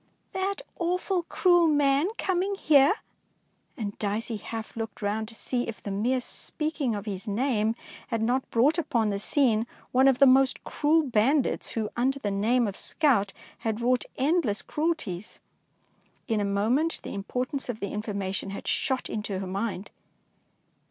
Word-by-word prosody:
" - - -44
That 390 +5 -2 0.2
awful, 360 +2 0
cruel 350 0 +3
man 290 0 +3
coming 380 +2 0
here!'^ 295 -1 +5 0.8
and 205 -3 -4
Dicey 215 +2 -2
half 225 +1 -7
looked 225 -1 -5
round 215 +2 -1
to 225 - -10
see 245 +2 -2
if 225 - -7
the 200 - -4
mere 240 +6 +1
speaking 300 -4 -2
of 205 0 -5
his 200 0 -5
name 220 0 +1 0.3
had 230 -2 -1
not 250 +3 0
brought 285 +9 +3
upon 235 -9 +1
the 200 - -2
scene 230 -1 +2 0.2
one 260 +2 +5
of 265 -2 +5
the 275 - +7
most 265 0 +4
cruel 310 +2 +2
bandits 260 +2 +1
who 220 -2 -2
under 265 +3 +1
the 210 -7 -2
name 225 +4 +2
of 200 - -5
scout 240 -11 +1 0.3
had 220 -1 -2
wrought 245 +1 +1
endless 270 - +1
cruelties. 295 - -2 0.9
In 225 -3 +1
a - - 0
moment 225 +11 +1
the - - -6
impor 250 +6 -2
tance 275 -2 -3
of 225 -3 -3
the 200 - -4
information 200 -2 -3
had 195 - -7
shot 260 -1 0
into 210 -2 -3
her 190 - -4
mind 195 +1 -3
240 Hz, 165 wpm, -27 LUFS, 210-290 Hz, 0.9 s, the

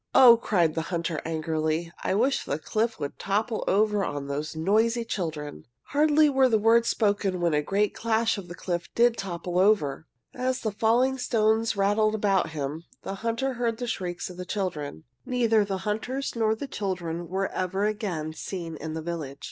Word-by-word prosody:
"Oh," 245 -3 +10
cried 180 -9 +1
the 165 - -1
hunter, 170 -3 -2
angrily, 160 +1 -1
"I - - +1
wish 255 +6 +2
the 145 - -2
cliff 220 +7 -1
would 145 -1 -5
topple 215 +3 -1
over 210 +1 +2
on 145 -5 -3
those 145 +3 -4
noisy 220 +8 +2
children!" 155 - -4 0.2
Hardly 300 +1 +4
were 265 -2 +4
the 225 - +4
words 230 +2 +4
spoken 205 -3 +1
when 175 -2 0
with 150 - +2
a - - 0
great 200 +6 0
clash 225 0 +1
the 175 -3 -8
cliff 175 -2 -3
did 235 0 +4
topple 180 -3 -3
over. 160 -8 +2 0.3
As 255 0 -1
the 220 - -1
falling 240 +5 +2
stones 225 -2 +2
rattled 205 +2 +2
about 200 -4 +1
him 155 +1 -4 0.2
the - - -4
hunter 230 +4 -1
heard 235 -2 -1
the 245 - -3
shrieks 180 -6 -3
of 180 - -10
the 180 - -4
children. 160 - -3 0.2
Neither 230 -4 +2
the 195 -1 -2
hunters 245 +7 -2
nor 220 -1 +2
the 250 - -5
children 175 -6 -3
were 190 +3 -1
ever 190 +2 -1
again 190 -8 -2
seen 165 0 -6
in 160 +1 -5
the 160 - -4
village. 155 -5 -5
200 Hz, 180 wpm, -26 LUFS, 165-225 Hz, 0.3 s, Oh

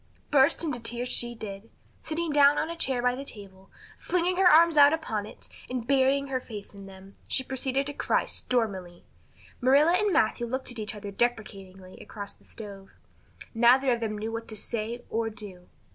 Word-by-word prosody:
Burst 285 +4 +4
into 290 -7 -2
tears 240 +2 -3
she 240 -1 -1
did. 210 0 -8 0.3
Sitting 325 0 -3
down 290 0 +5
on 315 - -1
a - - -5
chair 265 -7 -1
by 250 0 +3
the 265 +2 -6
table, 195 -6 -10 0.3
flinging 360 0 0
her 380 -1 +5
arms 335 0 +6
out 290 0 +7
upon 220 -10 -3
it, - - -11 0.2
and 250 -2 -3
burying 275 +1 +2
her 260 -1 -1
face 210 -5 -10
in 200 -1 -11
them, 195 0 -14
she 260 - 0
proceeded 265 +1 -1
to 290 - -4
cry - - 0
stormily. 190 -8 -1 0.6
Marilla 280 +6 +5
and 415 +2 +2
Matthew 235 -4 +1
looked 260 +2 -4
at 240 - -7
each 215 0 -5
other 205 -1 -7
deprecatingly 195 -5 -3
across 205 -2 -8
the - - -27
stove. 200 -3 -10 0.6
Neither 250 +3 +4
of 240 - +1
them 215 -2 -3
knew 220 +2 -4
what 230 0 -5
to 215 - -7
say 230 +2 -4
or 225 0 -1
do. 205 -5 -10
240 Hz, 190 wpm, -27 LUFS, 210-275 Hz, 0.6 s, out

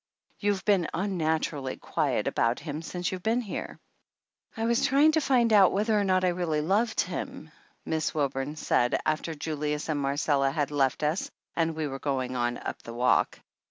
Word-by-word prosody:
You've 205 -2 0
been 195 -6 +3
unnaturally 160 -7 -1
quiet - - -1
about 115 +1 +1
him 150 -1 -5
since 180 +2 -3
you've 185 -1 -5
been 225 +5 +1
here 215 - -6 0.4
!" - - -31
"I 225 - -1
was 235 0 +2
trying 285 +4 +5
to 315 0 +2
find 245 -5 +3
out 195 -3 +6
whether 215 +3 +1
or - - +2
not 185 -1 +2
I - - +4
really 175 -3 -1
loved 210 +8 +1
him," - - -6 0.3
Miss 160 -1 -1
Wilburn 140 -1 -2
said, 125 -5 +1
after 155 +1 -1
Jul 155 +1 -4
ius 150 +1 -2
and 150 -2 0
Marcella 140 0 +1
had 145 0 -1
left 135 -1 +1
us 155 +5 0 0.3
and 165 -1 0
we 155 -1 -2
were 135 -1 -5
going 130 -3 -2
on 120 0 0
up - - -6
the 115 - -9
walk. 125 +1 +2
160 Hz, 190 wpm, -28 LUFS, 140-195 Hz, 0.4 s, out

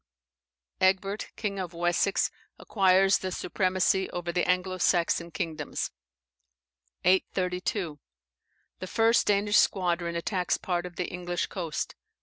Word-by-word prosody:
Egbert, 195 +2 +1
king 200 -3 -3
of 180 -2 -5
Wessex, 175 +3 +1 0.3
acquires 195 -1 +3
the 185 - -4
supremacy 185 +1 +1
over 175 -1 -4
the 175 +1 0
Anglo 185 0 0
Saxon 170 -1 +2
kingdoms. 155 -3 -3 1.1
832. 180 -2 0 0.8
The 185 - -5
first 225 +4 +3
Danish 205 +1 +3
squadron 175 -3 +1
attacks 180 +1 0
part 180 -1 -2
of 175 - -13
the 180 - -2
English 175 0 -3
coast. 170 -5 -4
185 Hz, 115 wpm, -28 LUFS, 175-195 Hz, 1.1 s, acquires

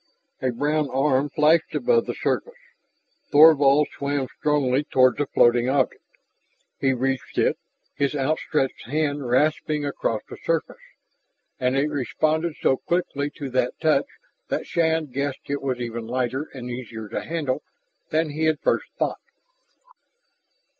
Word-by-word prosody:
A 130 - +1
brown 145 +4 0
arm 135 +1 +1
flashed 155 +3 +3
above 470 -2 +2
the - - -3
surface. 485 0 -2 0.7
Thorvald 145 -1 +6
swam 140 -1 -1
strongly 145 -2 +2
toward 130 -3 +3
the 145 - -1
floating 120 0 +3
object. 135 -1 +1 0.8
He 135 - +2
reached 130 0 -2
it, - - +2 0.3
his 140 +1 -1
outstretched 140 -2 -1
hand 145 -2 -1
rasping 150 +3 +1
across 115 -6 -2
the - - -9
surface. 165 -5 -2 0.8
And 130 +1 +1
it 145 +2 +1
responded 155 +4 0
so 130 - +2
quickly 145 -4 -1
to 140 -4 -6
that 125 -1 0
touch 155 -3 +2 0.4
that - - -2
Shann 160 -1 +1
guessed 140 0 -4
it 140 - -1
was 130 -2 -2
even 115 -1 -5
lighter 130 +4 -2
and 125 -3 -8
easier 115 -3 -7
to - - -3
handle 155 -6 -2 0.5
than 160 -1 0
he 155 +2 -1
had 155 -2 +2
first - - 0
thought. - - -1
140 Hz, 140 wpm, -24 LUFS, 130-155 Hz, 0.8 s, Thorvald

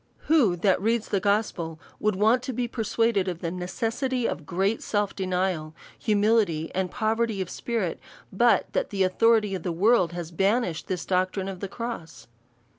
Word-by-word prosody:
AVho 235 - +4
that 190 -2 +3
reads 225 +1 0
the 200 - +1
gospel, 195 -6 -1 0.2
would 210 -2 +1
want 220 +5 +3
to 255 +1 -4
be 245 +1 -1
per 235 0 -5
suaded 220 -2 +1
of 180 -2 -2
the 170 - -2
necessity 230 +7 -2
of 150 - -5
great 195 +5 0
self 205 -2 -1
denial, 180 -4 -1 0.2
humility, 210 -7 +2
and 185 -1 -1
poverty 225 -1 0
of 185 -2 -3
spirit, 225 -8 -2 0.3
but 235 +5 +4
that - - 0
the 195 -2 +1
authority 210 +2 +3
of 185 - -3
the 175 - -2
world 185 0 +3
has 175 -1 -5
banished 195 -1 0
this 185 -2 -3
doctrine 185 +1 0
of 190 -2 -6
^lie 200 - -5
cross? 195 - -6
200 Hz, 175 wpm, -26 LUFS, 180-225 Hz, 0.3 s, AVho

